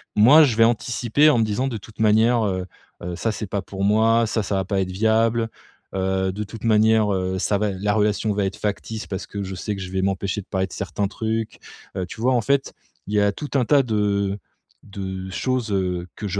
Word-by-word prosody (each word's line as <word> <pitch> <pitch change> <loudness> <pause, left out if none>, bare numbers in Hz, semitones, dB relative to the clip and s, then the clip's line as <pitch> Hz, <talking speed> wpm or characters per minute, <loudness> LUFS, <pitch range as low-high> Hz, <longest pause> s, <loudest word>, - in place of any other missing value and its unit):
Moi 135 +10 +8
je 125 -7 +1
vais 115 - +6
anticiper 120 +5 +2
en 120 - +2
me - - +3
disant: 110 +5 -1
«De 120 -4 -3
toute 105 +1 -15
manière, 110 +2 +4
heu, 95 -2 -2 0.4
heu, 90 0 -4
ça 115 - -1
c'est 110 0 -5
pas 100 +1 -3
pour 95 0 -5
moi 110 +3 +3
ça, 110 0 -1
ça 100 - -3
va 95 -1 0
pas 95 0 0
être 95 -1 -3
viable. 115 +3 +1 0.5
Heu, 95 0 0
de 105 +3 -4
toute 110 +3 -9
manière, 110 -1 +4
heu, 95 0 -1
ça 100 - +1
va 105 0 0
la 100 +2 -1
relation 105 0 +1
va 100 -1 +1
être 95 - -4
factice, 105 +1 -4
parce 95 -1 -5
que 100 - -6
je 95 0 -6
sais 105 +3 -3
que 95 - -7
je 90 -1 -6
vais 95 0 -1
m'empêcher 100 +1 -1
de - - -17
parler 95 0 -1
de - - -13
certains 100 - -2
trucs». 110 +2 -3 0.4
Heu, 95 - -1
tu 100 +5 -9
vois? 130 +2 +3
En 120 - +2
fait, 140 +4 0 0.3
il 105 - -5
y - - +4
a 100 0 +3
tout 145 +8 -7
un 130 -3 +3
tas 145 +3 +5
de 100 -3 0 0.5
de 95 -1 -6
choses, 125 +1 -1
heu, 90 -2 -1
que 105 - -5
je 100 +1 -2
105 Hz, 240 wpm, -22 LUFS, 95-115 Hz, 0.5 s, Moi